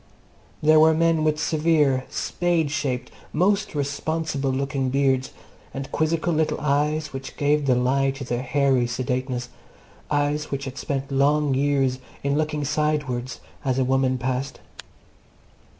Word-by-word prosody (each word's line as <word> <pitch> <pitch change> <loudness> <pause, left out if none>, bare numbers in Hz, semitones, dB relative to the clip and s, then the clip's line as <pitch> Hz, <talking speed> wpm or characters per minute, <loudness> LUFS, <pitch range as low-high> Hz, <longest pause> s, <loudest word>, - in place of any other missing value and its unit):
There 155 0 +6
were 160 0 +6
men 165 -1 +2
with 155 0 +1
severe, 150 -5 +2
spade 170 -4 0
shaped, 130 -5 -2 0.2
most 195 +3 +1
responsible 145 0 -2
looking 135 0 -1
beards, 130 -1 +1 0.5
and 135 0 -5
quizzical 165 +2 0
little 155 0 0
eyes 150 +1 0
which 135 0 -7
gave 145 0 +1
the 130 - +4
lie 135 +2 +2
to 135 0 -5
their 120 -1 -2
hairy 135 -2 +2
sedateness 125 0 -2 0.6
eyes 145 +1 0
which 140 0 -3
had 135 +1 -6
spent 140 -1 -3
long 145 +1 +2
years 135 -1 +1 0.2
in 140 0 +1
looking 150 -1 -1
sidewards 145 -4 -1 0.2
as 130 -3 0
a 130 - +3
woman 130 0 +2
passed. 130 +2 -3
140 Hz, 135 wpm, -24 LUFS, 130-150 Hz, 0.6 s, There